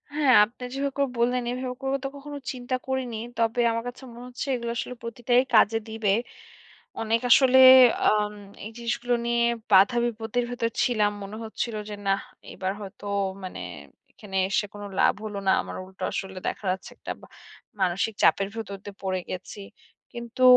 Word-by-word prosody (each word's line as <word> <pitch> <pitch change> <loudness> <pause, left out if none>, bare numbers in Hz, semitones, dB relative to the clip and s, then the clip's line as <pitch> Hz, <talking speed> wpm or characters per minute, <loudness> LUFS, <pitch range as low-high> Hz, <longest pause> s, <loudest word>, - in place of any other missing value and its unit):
হ্যাঁ 285 -4 +5
আপনি 240 +3 -13
যেভাবে 275 +1 -1
করে 280 -1 +2
বল্লেন 245 +1 +1
এভাবে 250 0 -4
করে 270 0 0
তো 270 - -1
কখনো 285 +1 -8
চিন্তা 255 0 -3
করিনি। 260 -3 -2 0.2
তবে 230 +1 +1
আমার 230 0 -2
কাছে 250 +2 -8
মনে 240 +1 -10
হচ্ছে 250 +2 -6
এগুলো 235 -1 -3
আসলে 250 - -4
প্রতিটাই 240 +1 +2
কাজে 220 0 +5
দিবে। 220 -2 -2 0.9
অনেক 225 +1 +1
আসলে 260 +1 +6 0.5
আম 210 0 +2 0.3
এই 220 - -7
জিনিসগুলো 240 +1 -1
নিয়ে 235 0 +2 0.3
বাধা-বিপত্তির 235 +3 +3
ভেতর 230 -1 -1
ছিলাম। 215 -5 +2
মনে 200 +2 -7
হচ্ছিল 225 +1 -4
যে - - -5
নাহ 195 +4 +2 0.3
এবার 190 0 -2
হয়তো 200 0 -10 0.4
মানে 185 - -6 0.5
এখানে 195 -2 -10
এসে 210 +2 +1
কোনো 205 0 -8
লাভ - - +5
হলো 210 -2 -5
না। - - +6
আমার - - -8
উল্টো 190 0 -10
আসলে 190 -1 -5
দেখা - - -4
যাচ্ছে 185 0 -5
একটা - - -6
বা - - -14 0.5
মানসিক 190 +5 +1
চাপের 195 0 +4
ভেতর 200 -3 -5
দিয়ে 200 -1 -8
পড়ে 185 -1 -1
গেছি। 185 +2 -7 0.5
কিন্তু 235 +1 -7
230 Hz, 165 wpm, -26 LUFS, 205-245 Hz, 0.9 s, আসলে